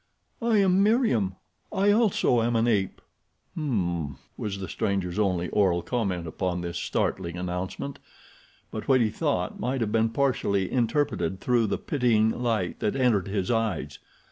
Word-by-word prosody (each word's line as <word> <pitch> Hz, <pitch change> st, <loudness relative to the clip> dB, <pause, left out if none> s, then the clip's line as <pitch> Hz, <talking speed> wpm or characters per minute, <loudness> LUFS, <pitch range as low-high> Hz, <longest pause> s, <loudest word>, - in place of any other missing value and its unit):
"I 230 Hz, -2 st, +3 dB
am 190 Hz, -1 st, +4 dB
Meriem. 200 Hz, -, +2 dB, 0.4 s
I, 200 Hz, +2 st, +3 dB
also, 205 Hz, -, +3 dB
am 120 Hz, +1 st, +1 dB
an 115 Hz, +1 st, +2 dB
ape." 100 Hz, -5 st, 0 dB, 0.5 s
"M 155 Hz, -3 st, -2 dB, 0.4 s
m," 70 Hz, -, -9 dB, 0.2 s
was 100 Hz, -2 st, -4 dB
the 95 Hz, -1 st, -5 dB
stranger's 100 Hz, -3 st, -1 dB
only 90 Hz, -4 st, +1 dB
oral 90 Hz, -4 st, +2 dB
comment 95 Hz, -6 st, -1 dB
upon 90 Hz, +2 st, -2 dB
this 85 Hz, 0 st, -4 dB
startling 85 Hz, 0 st, -2 dB
announcement; 90 Hz, +9 st, -4 dB, 0.7 s
but 110 Hz, -, -6 dB
what 130 Hz, -2 st, +5 dB
he 110 Hz, -3 st, +2 dB
thought 110 Hz, -, -1 dB
might 130 Hz, +4 st, -1 dB
have 110 Hz, -2 st, 0 dB
been 115 Hz, 0 st, +2 dB
partially 115 Hz, -7 st, 0 dB
interpreted 120 Hz, -, 0 dB
through 120 Hz, -1 st, +2 dB
the 100 Hz, -, -1 dB
pitying 115 Hz, -6 st, +2 dB
light 115 Hz, -8 st, -1 dB
that 105 Hz, -, 0 dB
entered 120 Hz, -8 st, +2 dB
his 100 Hz, +1 st, -1 dB
eyes. 100 Hz, -, -1 dB
110 Hz, 155 wpm, -26 LUFS, 95-125 Hz, 0.7 s, what